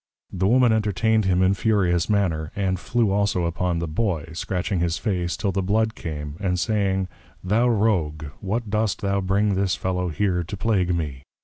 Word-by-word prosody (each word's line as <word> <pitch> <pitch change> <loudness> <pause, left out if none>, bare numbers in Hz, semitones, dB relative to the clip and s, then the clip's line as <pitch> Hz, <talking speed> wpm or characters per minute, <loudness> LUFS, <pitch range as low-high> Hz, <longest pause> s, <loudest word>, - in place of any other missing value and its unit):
The 95 +1 +1
Woman 125 +1 +4
entertained 110 0 +1
him 95 -1 +3
in 95 +1 +4
furious 90 -4 +1
manner; 85 -7 0
and 95 -2 0
flew 115 0 +1
also 100 -3 +1
upon 85 +1 -1
the 85 0 -2
Boy, 80 -2 -2
scratching 90 +2 -2
his 85 0 0
Face 90 -5 -1
till 100 - 0
the 95 +1 -1
Blood 110 +4 +1
came; 75 -4 -6
and 90 -2 0
saying, 95 -2 0 0.4
_Thou 110 +6 +3
Rogue, 95 -9 +1 0.2
what 105 +2 -3
dost 110 0 0
thou 100 -1 0
bring 100 +2 +1
this 95 -1 +1
Fellow 90 -1 -2
here 90 +2 0
to 100 +5 -6
plague 95 -5 +1
me? 75 -6 -3
95 Hz, 180 wpm, -23 LUFS, 85-105 Hz, 0.4 s, Woman